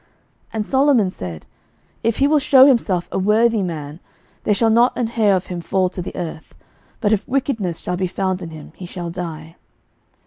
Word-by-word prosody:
11:001:052 - - -37 0.5
And 215 -2 -2
Solomon 265 -8 +3
said, 85 - -7 0.6
If 230 -1 0
he 275 - +3
will 300 0 +4
shew 265 -1 +7
himself 220 -10 +2
a - - -1
worthy 220 +3 +3
man, 155 -4 -5 0.5
there 210 - +3
shall 225 +1 +2
not 235 +3 +3
an 245 - +1
hair 220 -3 +2
of 185 - -2
him 175 -1 -5
fall 185 +2 0
to 180 - -6
the 175 - -7
earth: 165 -3 -7 0.4
but 210 -2 +2
if 210 - -1
wickedness 230 - -1
shall 180 - -3
be 185 0 0
found 185 0 -2
in 170 - -6
him, 155 -1 -11
he 180 - -9
shall 175 -2 -6
die. 165 -2 -7
190 Hz, 200 wpm, -20 LUFS, 175-230 Hz, 0.6 s, shew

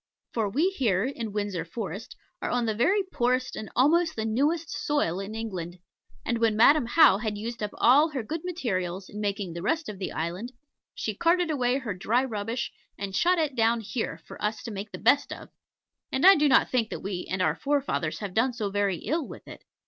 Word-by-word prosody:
For 220 -3 0
we 315 - +1
here, 215 - +1
in 235 -4 -4
Windsor 205 -5 -2
Forest, 200 +3 -6 0.3
are - - -2
on 245 -1 0
the 220 - 0
very 380 - +2
poorest 255 -7 0
and 215 - -6
almost 325 +6 +3
the 220 - -2
newest 295 +9 0
soil 290 - 0
in 200 +2 -6
England; 185 -6 -5 0.5
and 235 -1 0
when 225 -2 +2
Madam 275 +3 +6
How 240 -7 +6
had 215 -2 -3
used 230 +2 -5
up 210 - -1
all 285 +7 +5
her 270 -6 -4
good 310 +8 -5
materials 190 - -3
in 210 - -6
making 200 -3 -2
the 170 - -6
rest 320 - 0
of 200 -3 -7
the 190 - -3
island, 180 +10 -4 0.4
she - - -3
carted 345 0 +2
away 255 -3 +1
her 245 -7 -4
dry 230 +8 +1
rubbish 225 0 -3 0.3
and 195 -1 -5
shot 355 - +3
it 305 -5 0
down 230 0 +3
here 225 +2 -4
for - - -11
us 215 +1 -1
to 230 - -6
make 205 +1 -6
the - - -6
best 285 - +3
of; - - -8 0.6
and 265 - +1
I 385 - +11
do 300 -4 +3
not 265 - +4
think 235 -4 +1
that - - -6
we 190 -2 -4
and 185 - -2
our 185 - +2
forefathers 275 - -1
have 200 -3 -5
done 250 +4 +2
so 215 -4 -3
very 200 -2 0
ill 315 -2 -1
with - - -11
it. - - -11
230 Hz, 215 wpm, -27 LUFS, 200-280 Hz, 0.6 s, I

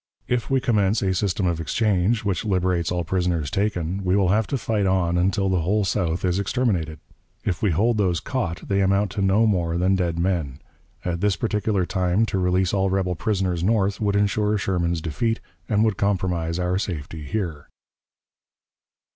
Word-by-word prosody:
If 125 -2 -1
we 135 -1 +3
commence 110 -5 +1
a 95 -1 +1
system 95 0 0
of 85 -2 0
exchange, 105 +3 +1
which 100 -3 0
liberates 90 -4 0
all 90 -1 -1
prisoners 85 -5 -1
taken, 95 -2 -1
we 90 0 +2
will 95 -3 +3
have 105 +2 +2
to 140 - -1
fight 105 -3 0
on 90 -2 +1
until 95 +2 +1
the 95 -2 +1
whole 100 +5 +1
South 90 -2 -1
is 90 +1 +1
exterminated. 95 - -1 0.5
If 90 - -1
we 105 - +2
hold 110 +7 +2
those 90 -4 +1
caught, 90 -5 -3
they 100 0 +1
amount 100 +1 +2
to 100 - -3
no 100 +4 +3
more 85 -5 +1
than 90 +2 +2
dead 85 -3 0
men. 85 -7 -1 0.5
At 85 -1 -2
this 105 -2 +2
particular 105 -4 0
time 95 +4 +1
to 95 - -2
release 90 0 +1
all 95 -1 +2
rebel 95 -1 0
prisoners 95 -2 -1
North 100 0 +1
would 100 -1 +1
insure 105 +1 +1
Sherman's 85 -4 -1
defeat, 115 +9 -1 0.3
and 105 0 +3
would 110 -3 +1
compromise 90 -4 0
our 90 +1 0
safety 80 -5 -5
here." 80 -2 -4
95 Hz, 180 wpm, -23 LUFS, 90-105 Hz, 0.5 s, we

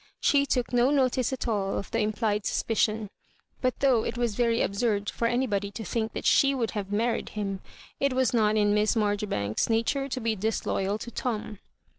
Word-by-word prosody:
She 280 -1 +3
took 250 -2 -1
no 245 +1 +4
notice 260 -3 +2
at 260 -1 -3
all 200 -4 -1
of - - -6
the - - 0
implied 210 -1 0
suspicion. 215 -2 0 0.5
But 255 0 -1
though 255 -5 +4
it 230 - -3
was 240 -3 0
very 230 +1 +2
ab - - -2
surd 205 -1 0
for 235 - -1
anybody 225 -5 0
to 220 +2 -7
think 220 +2 -2
that - - -5
she 275 0 +4
would 235 -4 -1
have 200 -2 -4
married 230 +3 0
him, 195 -2 -4 0.4
it 275 -1 +1
was 260 -1 +1
not 215 -2 +3
in 205 -1 +3
Miss 210 +2 +2
Marjoribanks's 205 - 0
nature 230 +5 0
to 255 - -3
be 225 -2 0
disloyal 205 -1 -1
to 235 - -8
Tom. 215 -4 -4
225 Hz, 195 wpm, -27 LUFS, 205-245 Hz, 0.5 s, no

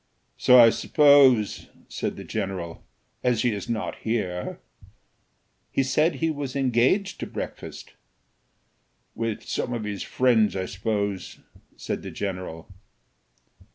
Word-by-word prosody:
"So 125 - +6
I 115 -2 +9
suppose," 140 -8 +4 0.2
said - - -4
the - - -7
general, 95 -5 -5 0.4
"as 125 -3 +2
he 120 - +2
is 100 +1 -6
not 115 -2 -3
here." 95 -6 -3 1.1
"He 135 - +1
said 150 +5 +2
he 160 +4 0
was 140 -3 -5
engaged 135 - +1
to - - -4
breakfast." - - -7 1.2
"With 115 -2 -3
some 125 - -3
of 115 -2 -3
his 105 -2 -4
friends, 115 -5 +2
I 95 -1 -2
suppose," 100 0 -3 0.4
said - - -4
the - - -7
general. 90 -3 -6
115 Hz, 120 wpm, -25 LUFS, 100-130 Hz, 1.2 s, I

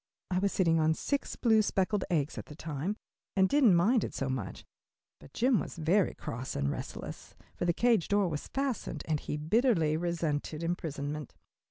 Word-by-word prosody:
I 180 - +2
was 200 +1 +1
sitting 165 -3 +3
on 160 0 +3
six 280 - -2
blue, 220 -3 +4
speckled 200 0 0
eggs 155 -4 0
at - - -8
the 150 - -10
time, 160 +6 -3 0.4
and 190 -1 +5
didn't 255 -6 +5
mind 210 +7 +4
it - - -5
so 135 - -2
much, 125 -8 -4 0.5
but - - -15
Jim 245 - +3
was - - -5
very 170 +4 +2
cross 125 +3 -5
and 70 0 0
restless, - - -7 0.2
for - - -2
the 175 - +4
cage 230 0 +2
door 205 -1 +3
was 150 -4 -4
fastened 265 - -2
and 155 -2 +1
he 150 - -4
bitterly 165 - +2
resented 160 -2 -2
imprisonment. 150 -4 -3
170 Hz, 180 wpm, -31 LUFS, 150-210 Hz, 0.5 s, and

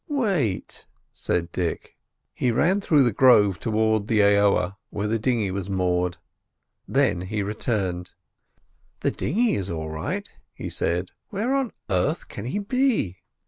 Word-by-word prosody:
"Wait," 190 - -1 0.3
said 85 0 -1
Dick. 85 -2 -3 0.4
He 125 - 0
ran 175 - +2
through 150 -7 +4
the 120 - +3
grove 105 -6 +5
towards 110 0 +1
the 110 -2 +3
aoa 100 -2 +3
where 105 0 -3
the 115 +1 0
dinghy 110 -4 0
was 95 0 -4
moored; 90 -2 0 0.7
then 130 -10 +2
he 100 +3 -2
returned. 100 -4 -2 0.9
"The - - +1
dinghy 225 - +1
is 95 -1 -2
all 80 -2 -4
right," 80 0 -3 0.3
he - - -5
said. 90 +2 -1 0.2
"Where 220 +6 -1
on 270 -4 0 0.2
earth 105 - 0
can 105 - -7
he 130 - -2
be?" 215 - +1
105 Hz, 140 wpm, -24 LUFS, 90-140 Hz, 0.9 s, grove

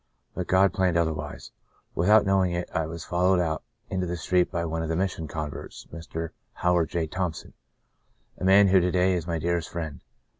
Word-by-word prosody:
But - - -4
God 95 +1 +4
planned 90 -3 +2
otherwise. 80 -3 -2 0.4
With 90 +4 +1
out 105 -1 +7
knowing 95 -2 +2
it 85 0 -2
I 80 -3 0
was 85 0 -7
followed 90 +1 +2
out 80 -3 -1 0.3
into 95 -1 -2
the 90 +1 -3
street 90 +2 +2
by 85 -2 -1
one 80 0 -2
of 80 - -3
the 80 - 0
Mission 90 -3 -2
converts, 75 -1 -6
Mr. 80 0 -5 0.2
Howard 90 -2 +1
J. 85 -2 -1
Thompson, 85 -1 -4 0.9
a - - -6
man 95 +1 +6
who 95 0 +6
to 90 0 +1
day 90 +1 +2
is 85 -2 -2
my 85 -1 -1
dearest 85 0 -1
friend. 80 -5 -5
85 Hz, 195 wpm, -26 LUFS, 80-95 Hz, 0.9 s, out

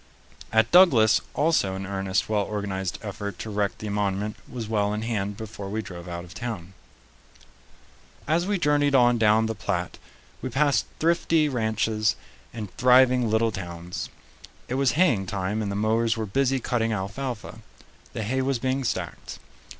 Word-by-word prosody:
At 110 0 +3
Douglas 135 - +6
also 145 -12 +2
an 95 0 -5
earnest, 95 -1 -1
well 105 -1 +1
organized 95 -3 -3
effort 100 0 -5
to 110 - -6
erect 100 -1 -1
the 105 - -6
monument 100 +1 -1
was 120 -3 -5
well 105 -1 0
in 110 - -3
hand 105 -3 -2
before 105 -3 -7
we 110 +2 -3
drove 85 -2 -9
out 85 0 -5
of 90 0 -12
town. 95 -7 -6 1.5
As 170 +4 +1
we 205 -1 +1
journeyed 145 -4 +2
on 120 -2 +5
down 110 0 +4
the 110 - -1
Platte, 90 -4 -3 0.4
we 130 - -3
passed 140 +3 +2
thrifty 165 -1 +2
ranches 110 -4 0 0.4
and 105 -4 -7
thriving 125 -1 +5
little 110 +1 +2
towns. 85 -2 -6 0.6
It - - -4
was 135 -2 +2
haying 130 - +2
time, 100 +3 -2
and 100 -2 -2
the - - -3
mowers 110 +2 +1
were 110 - -2
busy 135 +5 +1
cutting 115 -2 0
alfalfa. 110 +4 -4 0.5
The 110 - -3
hay 130 +5 0
was 135 0 0
being 130 +2 -1
stacked. 120 - -4
110 Hz, 160 wpm, -25 LUFS, 100-130 Hz, 1.5 s, Douglas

